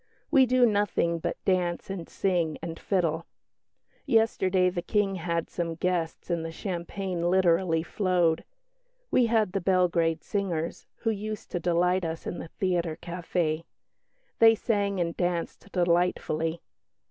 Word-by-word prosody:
We 270 Hz, -4 st, +6 dB
do 250 Hz, 0 st, +5 dB
nothing 205 Hz, -6 st, +1 dB
but -, -, -3 dB
dance 180 Hz, -1 st, 0 dB
and 175 Hz, -4 st, -6 dB
sing 175 Hz, -5 st, 0 dB
and 165 Hz, 0 st, -6 dB
fiddle. 170 Hz, -4 st, 0 dB, 0.8 s
Yesterday 190 Hz, -6 st, +3 dB
the 175 Hz, -1 st, -3 dB
King 200 Hz, +2 st, +1 dB
had 170 Hz, -1 st, -2 dB
some 165 Hz, -2 st, -3 dB
guests 175 Hz, 0 st, -2 dB
and 170 Hz, -1 st, 0 dB
the 165 Hz, -, -4 dB
champagne 175 Hz, 0 st, -3 dB
literally 175 Hz, -2 st, +3 dB
flowed. 175 Hz, -3 st, +1 dB, 0.7 s
We 245 Hz, -2 st, +4 dB
had 220 Hz, -4 st, +2 dB
the 195 Hz, -, -1 dB
Belgrade 170 Hz, -3 st, +2 dB
singers, 175 Hz, -5 st, -3 dB
who 225 Hz, -, +1 dB
used 215 Hz, 0 st, -5 dB
to 175 Hz, -, -1 dB
delight 180 Hz, +2 st, +2 dB
us 165 Hz, 0 st, -4 dB
in 175 Hz, -, -4 dB
the -, -, -6 dB
theatre 170 Hz, -2 st, -1 dB
café. 170 Hz, -2 st, -2 dB, 0.8 s
They 225 Hz, 0 st, +7 dB
sang 200 Hz, -3 st, 0 dB
and 170 Hz, -1 st, -1 dB
danced 175 Hz, +2 st, -2 dB
delightfully. 170 Hz, -2 st, +1 dB
180 Hz, 135 wpm, -27 LUFS, 170-195 Hz, 0.8 s, They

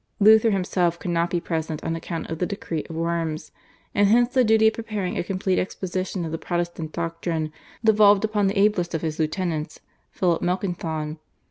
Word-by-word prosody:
Luther 220 Hz, +2 st, +7 dB
himself 180 Hz, -3 st, +1 dB
could 175 Hz, -, -4 dB
not 170 Hz, 0 st, +1 dB
be 175 Hz, -, 0 dB
present 160 Hz, -2 st, -3 dB
on 165 Hz, -, -1 dB
account 165 Hz, 0 st, -5 dB
of 160 Hz, -, -4 dB
the 180 Hz, -, 0 dB
decree 170 Hz, -6 st, -4 dB
of 165 Hz, -, -6 dB
Worms, 165 Hz, -1 st, -2 dB, 0.4 s
and 205 Hz, 0 st, +4 dB
hence 240 Hz, +3 st, +4 dB
the 255 Hz, -, +4 dB
duty 220 Hz, -1 st, +5 dB
of -, -, -9 dB
preparing 210 Hz, -5 st, -3 dB
a -, -, -1 dB
complete 185 Hz, 0 st, 0 dB
exposition 185 Hz, -1 st, -3 dB
of 160 Hz, -, -5 dB
the 165 Hz, -, -3 dB
Protestant 175 Hz, -2 st, -3 dB
doctrine 165 Hz, -2 st, -3 dB, 0.3 s
devolved 210 Hz, -2 st, +5 dB
upon 210 Hz, -2 st, +1 dB
the 195 Hz, +2 st, -1 dB
ablest 195 Hz, -4 st, +2 dB
of 160 Hz, -, -3 dB
his 160 Hz, 0 st, -3 dB
lieutenants, 160 Hz, -1 st, -2 dB, 0.3 s
Philip 175 Hz, -3 st, 0 dB
Melanchthon. 165 Hz, -4 st, -2 dB
175 Hz, 185 wpm, -24 LUFS, 165-200 Hz, 0.4 s, Luther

